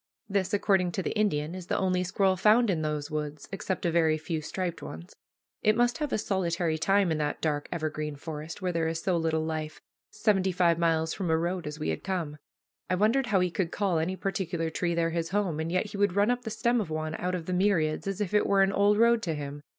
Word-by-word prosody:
This, 195 Hz, -2 st, 0 dB
according 195 Hz, -4 st, +2 dB
to 190 Hz, -, -2 dB
the -, -, -3 dB
Indian, 165 Hz, -7 st, 0 dB
is 185 Hz, -1 st, -7 dB
the -, -, 0 dB
only 185 Hz, -1 st, +1 dB
squirrel 190 Hz, +1 st, +2 dB
found 215 Hz, +3 st, +4 dB
in 165 Hz, -4 st, -1 dB
those 150 Hz, 0 st, -3 dB
woods, 150 Hz, -1 st, -4 dB
except 190 Hz, -1 st, -3 dB
a 170 Hz, -, +2 dB
very 160 Hz, -2 st, +3 dB
few 155 Hz, 0 st, -3 dB
striped 175 Hz, +2 st, -4 dB
ones. 80 Hz, +2 st, -9 dB, 0.5 s
It 215 Hz, 0 st, +3 dB
must 240 Hz, +3 st, +2 dB
have 300 Hz, -3 st, -2 dB
a -, -, +1 dB
solitary 175 Hz, -5 st, -1 dB
time 195 Hz, +1 st, +3 dB
in 155 Hz, -, 0 dB
that 150 Hz, -1 st, -1 dB
dark 145 Hz, -2 st, -1 dB
evergreen 155 Hz, -2 st, -3 dB
forest, 155 Hz, +4 st, -7 dB
where 180 Hz, -, +1 dB
there 165 Hz, -1 st, 0 dB
is 165 Hz, 0 st, -2 dB
so 185 Hz, +1 st, 0 dB
little 160 Hz, -1 st, 0 dB
life, 155 Hz, -1 st, -4 dB, 0.3 s
seventy 190 Hz, -3 st, +1 dB
five 170 Hz, -2 st, +2 dB
miles 160 Hz, -1 st, +1 dB
from 185 Hz, -4 st, -3 dB
a 160 Hz, -, +3 dB
road 175 Hz, 0 st, -2 dB
as 150 Hz, 0 st, -5 dB
we 155 Hz, -, -2 dB
had -, -, -3 dB
come. 170 Hz, -6 st, -3 dB, 0.5 s
I 185 Hz, -, +2 dB
wondered 230 Hz, +7 st, +2 dB
how 195 Hz, -4 st, +3 dB
he 180 Hz, -1 st, +1 dB
could 175 Hz, -1 st, -1 dB
call 190 Hz, -5 st, 0 dB
any 175 Hz, +4 st, -1 dB
particular 175 Hz, -4 st, -2 dB
tree 170 Hz, +1 st, -1 dB
there 165 Hz, 0 st, +1 dB
his 165 Hz, -1 st, -2 dB
home, 190 Hz, -6 st, 0 dB
and 160 Hz, +1 st, -2 dB
yet 185 Hz, +4 st, 0 dB
he -, -, -6 dB
would 200 Hz, -2 st, +2 dB
run 205 Hz, +4 st, +3 dB
up 245 Hz, 0 st, -1 dB
the -, -, -2 dB
stem 230 Hz, +2 st, +1 dB
of 185 Hz, -, -5 dB
one 155 Hz, 0 st, -3 dB
out 180 Hz, +1 st, -1 dB
of 170 Hz, -3 st, -5 dB
the 185 Hz, -, -2 dB
myriads, 180 Hz, -4 st, +1 dB
as 195 Hz, 0 st, -2 dB
if 205 Hz, -1 st, -2 dB
it 210 Hz, -, +3 dB
were 195 Hz, -1 st, +4 dB
an 195 Hz, +1 st, +1 dB
old 205 Hz, +1 st, +3 dB
road 235 Hz, 0 st, +4 dB
to 165 Hz, -6 st, -2 dB
him. 145 Hz, 0 st, -6 dB
175 Hz, 245 wpm, -28 LUFS, 160-195 Hz, 0.5 s, found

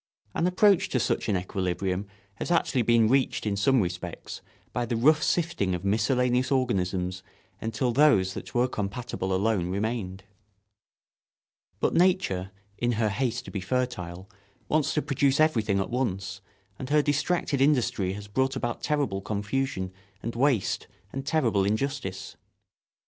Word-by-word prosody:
An 170 Hz, -, +1 dB
approach 190 Hz, +1 st, +4 dB
to 130 Hz, -, +1 dB
such 115 Hz, -, 0 dB
an 100 Hz, -, +2 dB
equilibrium 95 Hz, +1 st, -2 dB, 0.3 s
has -, -, -4 dB
actually 165 Hz, -7 st, +2 dB
been 115 Hz, -1 st, +4 dB
reached 130 Hz, 0 st, +1 dB
in 105 Hz, -2 st, 0 dB
some 125 Hz, +5 st, +3 dB
respects 90 Hz, -1 st, -5 dB, 0.3 s
by 120 Hz, -, 0 dB
the 120 Hz, 0 st, -2 dB
rough 150 Hz, +7 st, +4 dB
sifting 155 Hz, -, 0 dB
of 90 Hz, +2 st, -6 dB
miscellaneous 125 Hz, +5 st, +2 dB
organisms 95 Hz, -8 st, 0 dB, 0.4 s
until 115 Hz, +3 st, -1 dB
those 115 Hz, -9 st, +4 dB
that -, -, -8 dB
were 120 Hz, +1 st, +3 dB
compatible 105 Hz, -3 st, -3 dB
alone 95 Hz, -2 st, +1 dB
remained. 100 Hz, -1 st, -3 dB, 1.6 s
But -, -, +1 dB
nature, 170 Hz, -, +2 dB, 0.3 s
in 120 Hz, 0 st, +1 dB
her 110 Hz, -1 st, +1 dB
haste 120 Hz, +3 st, -1 dB
to -, -, -8 dB
be 100 Hz, -, -3 dB
fertile, 95 Hz, -5 st, -3 dB, 0.4 s
wants 155 Hz, -1 st, +1 dB
to 150 Hz, -, +1 dB
produce 140 Hz, 0 st, +1 dB
everything 110 Hz, -11 st, +3 dB
at 95 Hz, -, -2 dB
once, 95 Hz, -7 st, -2 dB, 0.4 s
and 130 Hz, -, -5 dB
her 150 Hz, 0 st, +4 dB
distracted 145 Hz, -1 st, 0 dB
industry 125 Hz, -9 st, +2 dB
has 105 Hz, +1 st, -8 dB
brought 130 Hz, +6 st, 0 dB
about 120 Hz, -3 st, -3 dB
terrible 140 Hz, -10 st, 0 dB
confusion 105 Hz, -1 st, -2 dB, 0.3 s
and 115 Hz, +1 st, -4 dB
waste 125 Hz, -5 st, +1 dB, 0.3 s
and 135 Hz, +1 st, -5 dB
terrible 115 Hz, -11 st, +2 dB
injustice. 105 Hz, -3 st, -2 dB
115 Hz, 145 wpm, -27 LUFS, 95-135 Hz, 1.6 s, approach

